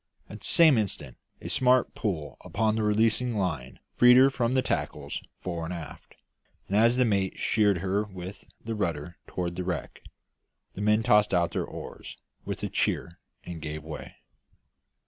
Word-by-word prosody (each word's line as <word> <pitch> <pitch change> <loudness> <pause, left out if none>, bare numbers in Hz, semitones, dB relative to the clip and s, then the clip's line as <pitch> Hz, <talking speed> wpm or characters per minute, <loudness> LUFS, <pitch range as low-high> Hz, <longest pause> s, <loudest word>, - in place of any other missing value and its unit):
At - - -9
the - - -8
same 160 -8 +6
instant 105 -3 -3 0.3
a - - -6
smart 130 -1 +3
pull 85 -9 -3
upon 110 0 0
the 110 - 0
releasing 110 +2 +2
line 70 -10 -2 0.2
freed 125 0 +8
her 135 +1 +7
from 125 -1 0
the 130 - +3
tackles - - -3 0.2
fore 85 -2 -4
and 80 - -4
aft; 85 -3 -9 0.5
and 100 - -2
as 115 +3 +4
the 125 - +4
mate 100 -4 0
sheered 105 -3 +2
her 100 +3 +1
with 95 -1 -9
the 115 - -5
rudder 85 -5 -3
toward 85 -1 -3
the 90 - -3
wreck, 90 -2 -4 0.7
the 100 - -7
men 105 +1 +3
tossed 105 -3 +4
out 85 -1 +2
their - - -2
oars - - -9 0.3
with - - -5
a - - 0
cheer 85 - -1 0.2
and 85 -2 -7
gave 75 0 -5
way. 80 -1 -8
100 Hz, 170 wpm, -27 LUFS, 85-115 Hz, 0.7 s, freed